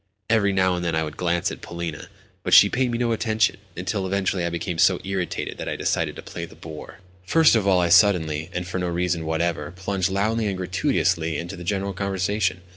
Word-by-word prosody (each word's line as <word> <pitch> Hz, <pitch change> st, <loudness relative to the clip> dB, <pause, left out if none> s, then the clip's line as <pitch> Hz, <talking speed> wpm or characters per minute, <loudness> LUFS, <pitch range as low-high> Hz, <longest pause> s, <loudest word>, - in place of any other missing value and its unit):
Every 105 Hz, -3 st, +3 dB
now 95 Hz, -1 st, +2 dB
and 90 Hz, -, -3 dB
then 85 Hz, -2 st, 0 dB
I 80 Hz, -, +1 dB
would 75 Hz, -1 st, -6 dB
glance 85 Hz, -1 st, 0 dB
at -, -, -8 dB
Polina 85 Hz, -2 st, -5 dB
Alexandrovna, -, -, -14 dB, 0.2 s
but -, -, -2 dB
she -, -, +8 dB
paid 125 Hz, 0 st, +1 dB
me 120 Hz, -, -1 dB
no 120 Hz, -1 st, 0 dB
attention; 110 Hz, -1 st, +1 dB, 0.2 s
until 95 Hz, +2 st, -2 dB
eventually 95 Hz, -1 st, 0 dB
I 85 Hz, -, 0 dB
became 85 Hz, 0 st, -4 dB
so -, -, +4 dB
irritated 95 Hz, -2 st, -3 dB
that -, -, -4 dB
I -, -, -2 dB
decided -, -, -1 dB
to -, -, -9 dB
play -, -, -7 dB
the -, -, -15 dB
boor. 80 Hz, -2 st, -10 dB, 0.3 s
First 160 Hz, -1 st, +5 dB
of 105 Hz, -3 st, +1 dB
all 95 Hz, -2 st, +4 dB
I 85 Hz, -1 st, +2 dB
suddenly, 85 Hz, -4 st, +4 dB
and 90 Hz, -1 st, -3 dB
for 90 Hz, 0 st, -3 dB
no 90 Hz, -, -1 dB
reason 85 Hz, -1 st, -1 dB
whatever, 85 Hz, +2 st, -1 dB
plunged 95 Hz, +1 st, -2 dB
loudly 105 Hz, +3 st, 0 dB
and 95 Hz, -2 st, -2 dB
gratuitously 90 Hz, -3 st, 0 dB
into 85 Hz, +4 st, -5 dB
the 90 Hz, -, -9 dB
general 100 Hz, +1 st, -2 dB
conversation. 95 Hz, 0 st, -1 dB
90 Hz, 220 wpm, -23 LUFS, 85-100 Hz, 0.3 s, she